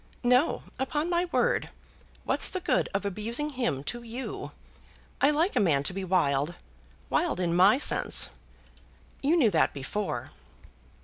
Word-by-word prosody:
"No; 250 +5 +3 0.2
upon 295 +5 -1
my 345 +1 +2
word. 350 - 0 0.5
What's - - +1
the 370 - -3
good 295 -8 0
of 200 0 -2
abusing 230 +9 -1
him 240 - -2
to 240 +10 -5
you? 235 +3 -6 0.7
I 280 - +6
like 320 +6 +1
a - - +3
man 150 -8 +2
to 180 - +1
be 195 +1 -4
wild, 170 -4 +1 0.6
wild 345 - +1
in 170 -2 0
my 190 +7 +6
sense. 290 - +2 0.9
You 295 +5 +3
knew 240 -10 +4
that 160 -4 +2
before." 145 +10 -4
230 Hz, 145 wpm, -28 LUFS, 180-295 Hz, 0.9 s, I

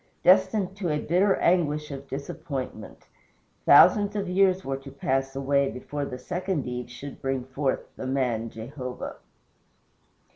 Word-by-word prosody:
destined 190 +1 +4
to 195 -4 -2
a 150 - +1
bitter 185 +6 +2
anguish 150 -4 +1
of 135 0 -7
disappointment! 140 0 -6 0.6
Thousands 200 +7 +7
of 200 -2 -1
years 190 0 +2
were 135 0 -2
to 135 0 -11
pass 135 0 -1
away 140 0 +2
before 145 +3 -5
the 125 - -6
second 180 +3 -3
Eve 125 0 -5
should 130 +3 -9
bring 135 -1 -1
forth 135 +1 -1
the 130 - -5
MAN 125 -4 0
Jehovah. 125 +3 -7
140 Hz, 140 wpm, -26 LUFS, 130-180 Hz, 0.6 s, Thousands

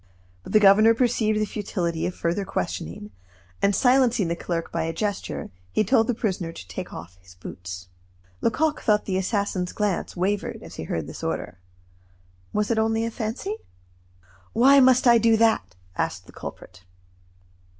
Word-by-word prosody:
But - - -9
the 215 - +7
governor 215 +3 +6
perceived 225 -3 +1
the 215 - +1
futility 175 -6 -2
of 180 - -5
further 170 +4 -1
questioning; 90 - -4 0.5
and 200 0 +3
silencing 245 -6 +3
the 170 - 0
clerk 170 -1 -3
by 165 - -1
a 165 - -2
gesture, 205 +2 -3 0.2
he - - +2
told 225 +1 +3
the 245 - 0
prisoner 190 -7 -2
to 90 - -11
take 85 - -6
off 90 +2 -10
his 90 0 -17
boots. 90 0 -8 0.5
Lecoq 305 +6 +1
thought 210 -1 +2
the 190 -1 0
assassin's 190 -2 -1
glance 205 -4 -1
wavered 195 +3 -2
as - - -11
he 80 - -5
heard 80 -1 -3
this - - -9
order. 90 - -3 0.9
Was 210 +2 0
it 225 - +2
only 225 +1 +1
a 230 - -3
fancy? 240 - -4 1.0
"Why 275 +4 +6
must 255 -1 +5
I 235 -1 +7
do 225 0 +4
that?" 220 - +2 0.2
asked - - -2
the - - -14
culprit. 90 0 -10
205 Hz, 165 wpm, -25 LUFS, 165-225 Hz, 1.0 s, the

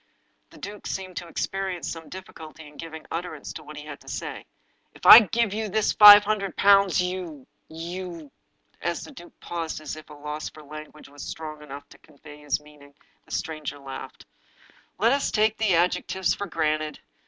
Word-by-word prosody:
The - - -16
duke 205 +1 -8
seemed 185 -1 -5
to 175 - -5
experience 190 +1 -3
some 165 -1 -7
difficulty 160 -4 -11
in 150 - -16
giving 160 -1 -8
utterance 165 -3 -5
to 155 - -9
what 150 0 -11
he 150 - -8
had 150 - -8
to - - -21
say. - - -6 0.2
" - - -43
If - - -13
I - - +13
give 225 0 0
you 215 0 -3
this 215 +2 +1
five 205 -1 +11
hundred 205 -3 -2
pounds, 200 -1 +5
you 180 -6 -3
— - - -46
^you 170 -2 -7 0.3
" - - -39
As 170 0 -2
the - - -10
duke 175 -11 -14
paused, 165 -2 -4
as 155 - -6
if 155 0 -13
at 150 - -11
a - - -18
loss 150 +1 -5
for 155 - -14
language 155 +1 -11
which - - -18
was 145 0 -12
strong 155 -1 -7
enough 145 -1 -10
to - - -17
convey 150 0 -15
his 150 -2 -1
meaning, 150 -1 -18 0.3
the - - -18
stranger 155 -3 -4
laughed. 135 -1 -9 0.4
" - - -29
Let 225 +4 +3
us 280 +1 +1
take 215 0 +2
the 210 -5 +2
adjectives 180 +2 +1
for 200 - -5
granted. 155 -3 -1
165 Hz, 205 wpm, -25 LUFS, 150-190 Hz, 0.4 s, I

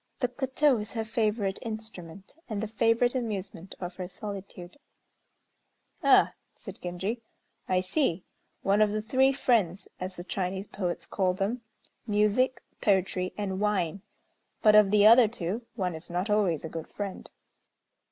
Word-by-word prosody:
The 250 - +1
koto 265 0 +2
is 210 0 -6
her 225 -2 -1
favorite 215 -3 0
instrument, 200 -5 -8 0.2
and 215 -2 -2
the - - -2
favorite 230 +3 +2
amusement 200 -7 -4
of 180 -1 -6
her 180 -1 -4
solitude." 195 0 -8 1.2
"Ah!" - - +5 0.2
said - - -10
Genji, 190 +6 -3 0.5
"I 185 -1 +3
see, 185 - 0 0.4
one 200 +2 +3
of 215 - +5
the 215 +1 -1
three 265 +4 +3
friends 210 -9 +1
(as 185 0 -5
the 175 - -7
Chinese 190 +1 -3
poets 180 -4 -4
call 185 -2 0
them) 210 +6 -1 0.5
Music, 210 +5 +2 0.2
Poetry, 190 -2 +1
and 190 -2 -2
Wine; 200 -3 0 0.6
but, 215 -2 +7
of 210 -2 +7
the 210 0 +5
other 230 +1 +8
two, 215 +2 -4
one 185 -5 -1
is 160 +2 -7
not 180 +4 -1
always 190 -7 +2
a - - -5
good 165 -1 -6
friend." 200 -2 -6
205 Hz, 150 wpm, -28 LUFS, 185-225 Hz, 1.2 s, other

